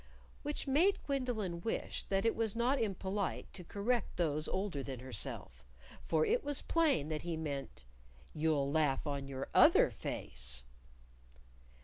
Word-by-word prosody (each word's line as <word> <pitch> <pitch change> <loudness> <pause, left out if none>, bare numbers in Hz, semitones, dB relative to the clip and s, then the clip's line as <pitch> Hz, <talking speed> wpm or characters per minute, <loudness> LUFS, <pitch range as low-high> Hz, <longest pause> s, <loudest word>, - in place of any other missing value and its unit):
(Which - - -3
made 325 +9 +4
Gwendolyn 235 -11 -1
wish 225 - -2
that 195 +2 0
it 225 - +3
was 225 -2 0
not 245 +4 +2
impolite 195 -2 -2
to 185 - -7
correct 205 +6 -1
those 155 -3 +1
older 185 -7 -2
than 130 -2 -5
herself; 125 - -5 0.4
for 155 -1 +2
it - - +2
was 290 -1 -1
plain 300 - +2
that 155 -1 -2
he 170 -2 -3
meant 140 - -5 0.5
"you'll 150 -3 +1
laugh 150 -3 +2
on 140 -2 -2
your 135 0 -5
other - - +7
face.") - - -4
170 Hz, 140 wpm, -35 LUFS, 140-225 Hz, 0.5 s, other